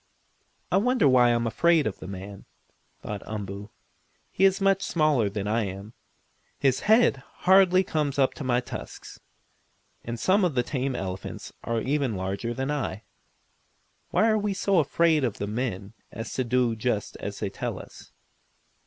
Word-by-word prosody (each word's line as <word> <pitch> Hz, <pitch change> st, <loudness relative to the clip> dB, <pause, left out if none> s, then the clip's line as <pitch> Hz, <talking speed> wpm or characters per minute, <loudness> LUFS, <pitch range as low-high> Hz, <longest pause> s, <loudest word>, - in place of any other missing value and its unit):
"I -, -, +4 dB
wonder 235 Hz, -, +3 dB
why 125 Hz, -2 st, +5 dB
I 120 Hz, -, +4 dB
am 120 Hz, 0 st, 0 dB
afraid 160 Hz, +7 st, +3 dB
of 105 Hz, -, -3 dB
the -, -, -8 dB
man?" 100 Hz, +1 st, -8 dB, 0.6 s
thought 105 Hz, -2 st, -5 dB
Umboo. 100 Hz, -1 st, -6 dB, 0.6 s
"He 195 Hz, -, +3 dB
is 190 Hz, 0 st, +3 dB
much 195 Hz, -1 st, +3 dB
smaller 150 Hz, -, +2 dB
than 100 Hz, 0 st, -4 dB
I 110 Hz, +1 st, +1 dB
am. 100 Hz, +3 st, -7 dB, 0.6 s
His 135 Hz, -2 st, +2 dB
head 220 Hz, -, +4 dB, 0.3 s
hardly 190 Hz, 0 st, +6 dB
comes 150 Hz, -5 st, -1 dB
up 135 Hz, -2 st, +3 dB
to -, -, -7 dB
my 125 Hz, -1 st, +1 dB
tusks, 125 Hz, -, -9 dB, 0.8 s
and 115 Hz, 0 st, -5 dB
some 190 Hz, -, +3 dB
of 170 Hz, -6 st, +1 dB
the 125 Hz, -, +2 dB
tame 130 Hz, 0 st, -2 dB
elephants 95 Hz, -4 st, -6 dB
are 115 Hz, 0 st, -1 dB
even 135 Hz, -3 st, 0 dB
larger 95 Hz, +5 st, -3 dB
than 135 Hz, +3 st, -2 dB
I. 120 Hz, -8 st, -3 dB, 1.1 s
Why 220 Hz, -, +3 dB
are 215 Hz, -1 st, +3 dB
we 205 Hz, -1 st, -1 dB
so 195 Hz, -2 st, +2 dB
afraid 160 Hz, +1 st, +2 dB
of 120 Hz, -5 st, -1 dB
the 100 Hz, -, -3 dB
men 105 Hz, -2 st, -4 dB, 0.2 s
as 115 Hz, -, -6 dB
to 130 Hz, -, 0 dB
do 125 Hz, -1 st, +1 dB
just 110 Hz, -2 st, -2 dB
as -, -, -6 dB
they -, -, -3 dB
tell -, -, -4 dB
us?" -, -, -12 dB
125 Hz, 170 wpm, -26 LUFS, 105-165 Hz, 1.1 s, hardly